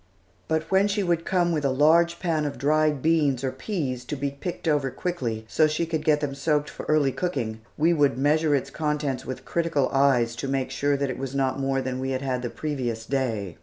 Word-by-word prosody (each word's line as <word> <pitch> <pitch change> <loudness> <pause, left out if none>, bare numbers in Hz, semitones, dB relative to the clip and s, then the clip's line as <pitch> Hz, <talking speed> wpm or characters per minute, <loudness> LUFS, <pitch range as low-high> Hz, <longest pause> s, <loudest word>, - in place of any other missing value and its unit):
But 160 0 +1
when 195 +1 +4
she 205 0 0
would 170 -2 0
come 175 -2 +2
with 155 -3 -1
a 140 - +2
large 165 +5 +4
pan 160 -4 0
of 145 - -4
dried 150 +1 +2
beans 150 -5 +2
or 130 - 0
peas 130 - -3
to 150 - -4
be 140 0 -2
picked 170 +5 -6
over 145 -3 +2
quickly, 125 -9 -3
so 155 - +3
that 155 - +1
she 170 +2 0
could 160 -2 -2
get 150 -1 +3
them 145 -2 -2
soaked 150 +1 0
for - - -8
early 150 -3 +3
cooking, 125 -11 -3 0.2
we 165 +3 +3
would 145 -6 +2
measure 150 +2 +3
its 135 - -2
contents 150 -4 -2
with 130 - -6
critical 165 -5 0
eyes 130 -4 +3
to 135 - -3
make 135 -1 -1
sure 140 +1 +1
that 140 -1 -1
it 130 - -6
was 135 0 -4
not 135 0 0
more 135 -1 0
than 130 0 -3
we 130 0 -2
had 130 0 -2
had 130 -2 -1
the 120 - -3
previous 125 -8 -3
day. 115 -9 -2
140 Hz, 230 wpm, -25 LUFS, 130-155 Hz, 0.2 s, when